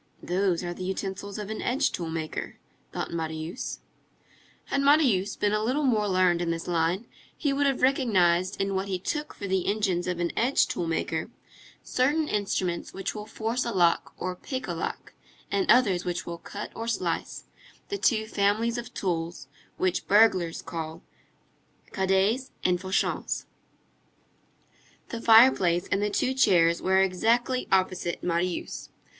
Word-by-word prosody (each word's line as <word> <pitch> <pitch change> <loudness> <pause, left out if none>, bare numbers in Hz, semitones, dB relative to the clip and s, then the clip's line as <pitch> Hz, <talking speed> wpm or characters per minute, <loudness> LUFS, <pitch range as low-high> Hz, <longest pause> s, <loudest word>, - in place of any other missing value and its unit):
"Those 180 -1 0
are 175 0 -3
the 185 - -7
utensils 190 +1 -4
of 210 0 -5
an 220 - -4
edge 275 +3 +1
tool 170 -2 -4
maker," 160 -1 -4 0.3
thought - - -4
Marius. 160 +4 -4 0.8
Had 275 - 0
Marius 275 -10 +3
been 205 0 0
a 215 - +1
little 260 +7 0
more 220 -6 +2
learned 185 -2 +3
in 170 - -1
this 165 0 -3
line, 175 +5 0 0.3
he 285 -2 0
would 285 +1 +2
have 270 -2 0
recognized 190 -9 +2
in 195 0 0
what 190 +1 -1
he 190 -2 -1
took 300 - -4
for 200 - -6
the 190 -2 0
engines 195 -4 0
of 180 -1 -2
an 170 -1 0
edge 255 +4 +3
tool 170 - -3
maker, 165 - -2 0.5
certain 295 +5 +1
instruments 190 -5 -2
which 195 0 -3
will 210 -1 -7
force 225 +3 -2
a 235 - -2
lock 175 -5 +2
or 185 0 -3
pick 260 +7 -5
a - - -2
lock, - - -5 0.4
and 380 -4 0
others 200 -8 +4
which 175 -1 -3
will 170 0 -6
cut 205 +4 -7
or 230 - -5
slice, 235 - -2 0.5
the 405 - -2
two 220 -4 +2
families 220 +3 +1
of 240 +1 -9
tools 170 -2 -3 0.3
which 185 -1 0
burglars 190 -6 +4
call 160 0 -6 0.9
cadets 195 +7 +1
and 180 -1 +2
fauchants. 190 0 -1 1.6
The 235 - -5
fireplace 220 -7 +5
and 200 - +2
the 210 - +1
two 250 +5 0
chairs 170 -9 +4
were 190 +1 +3
exactly 230 +7 +1
opposite 185 -2 0
Marius. 175 +1 -2
195 Hz, 155 wpm, -27 LUFS, 175-230 Hz, 1.6 s, fireplace